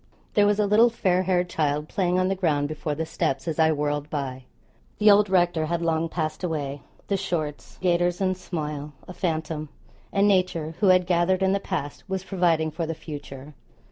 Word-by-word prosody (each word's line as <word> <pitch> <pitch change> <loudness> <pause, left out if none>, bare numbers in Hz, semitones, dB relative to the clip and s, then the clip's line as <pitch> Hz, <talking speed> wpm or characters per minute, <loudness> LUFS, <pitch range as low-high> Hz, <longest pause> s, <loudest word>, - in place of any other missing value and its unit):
There 205 -1 +4
was 205 0 +2
a 210 - +2
little 215 +4 +5
fair 185 -5 +1
haired 180 -1 +1
child 150 -2 -1
playing 180 -2 0
on 185 0 +2
the 190 - +1
ground 155 -7 +1
before 155 0 -3
the 160 +2 -2
steps 135 -3 -2
as 160 -1 -2
I 160 0 +5
whirled 145 0 -1
by. 130 -4 -4 0.5
The 210 0 +6
old 205 0 +5
rector 175 -4 +2
had 170 +1 -1
long 165 0 0
passed 155 +1 -3
away; 145 -5 -3 0.3
the 200 - +1
shorts, 160 -6 -4
gaiters, 175 0 +2
and 185 -1 +1
smile 150 -5 -5
a 180 - -8
phantom; 160 -3 -3 0.4
and 200 0 +3
nature, 180 -5 +1
who 205 - +3
had 185 -1 +5
gathered 180 +1 +2
in 190 - +3
the 200 - +1
past, 150 -8 -4
was 190 -1 -2
providing 170 -5 +1
for 165 +1 -3
the 165 - -3
future. 145 -2 -9
170 Hz, 195 wpm, -25 LUFS, 150-185 Hz, 0.5 s, The